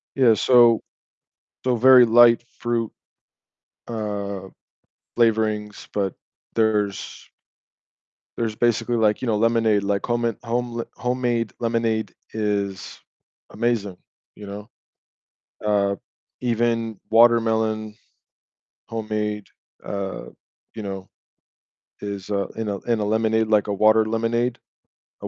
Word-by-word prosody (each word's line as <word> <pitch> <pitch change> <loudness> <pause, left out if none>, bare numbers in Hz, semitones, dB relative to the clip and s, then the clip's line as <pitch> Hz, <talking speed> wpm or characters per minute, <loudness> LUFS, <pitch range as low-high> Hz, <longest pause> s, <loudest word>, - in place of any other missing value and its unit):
Yeah, 125 -4 +5
so 120 +1 +5 0.9
so 125 -1 +2
very 125 +1 +7
light 120 0 +6 0.2
fruit, 120 -2 -1 1.0
uh, 100 -4 -4 0.7
flavorings, 110 -2 0
but 100 -3 -1 0.4
there's 105 -3 -1 1.1
there's 110 -2 -2
basically, 120 +1 +1
like, 110 0 +2
you - - -2
know, 110 -2 +1
lemonade, 110 -2 +2
like 100 0 -1
home 120 0 0
me 115 -1 +1
home 120 0 -2
le 115 - -2
homemade 120 -4 -1
lemonade 115 -3 0 0.2
is 100 -3 -3 0.5
amazing, 110 -4 -1 0.4
you 105 - -11
know? 100 +1 -8 1.0
Uh, 100 -1 +1 0.4
even 115 -2 -1
watermelon 110 -2 +3 0.9
homemade, 105 -2 -3 0.4
uh, 100 -1 -4 0.5
you 110 - -6
know, 95 -1 -6 0.9
is, 100 -1 -6
uh 100 -1 0
in 110 -1 -3
a 100 -1 -2
in 115 -2 0
a - - 0
lemonade, 110 +1 +1
like 105 -1 +2
a - - 0
water 110 +2 +4
lemonade 115 +2 -1 0.6
a - - -4
110 Hz, 110 wpm, -23 LUFS, 105-115 Hz, 1.1 s, very